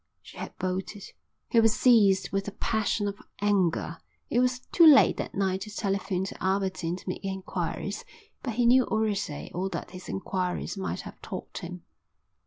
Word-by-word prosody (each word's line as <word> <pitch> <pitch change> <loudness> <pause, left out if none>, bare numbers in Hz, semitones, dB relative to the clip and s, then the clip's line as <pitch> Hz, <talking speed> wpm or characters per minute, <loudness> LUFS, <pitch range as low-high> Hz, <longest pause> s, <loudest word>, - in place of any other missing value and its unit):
She - - -14
had - - -7
bolted. 185 +2 -3 0.5
He 235 - +4
was 225 0 +4
seized 200 -7 +5
with 195 0 -1
a - - -3
passion 215 -1 0
of 200 0 -5 0.2
anger. 190 -5 +1 0.3
It 240 - +3
was 250 0 +1
too 340 - +5
late 285 -3 +7
that - - -4
night 190 -1 0
to 210 - -6
telephone 195 -2 -1
to 195 - -6
Aberdeen 190 -3 0
and - - -14
make 180 - -4
enquiries, 190 -1 -3 0.4
but 240 -5 -4
he 240 0 +2
knew 255 +2 +6
already 205 -8 -1
all 185 +3 -1
that 175 -1 -5
his 185 0 -9
enquiries 185 0 -2
might 195 - -3
have - - -11
taught - - -6
him. - - -8
195 Hz, 175 wpm, -28 LUFS, 185-220 Hz, 0.5 s, late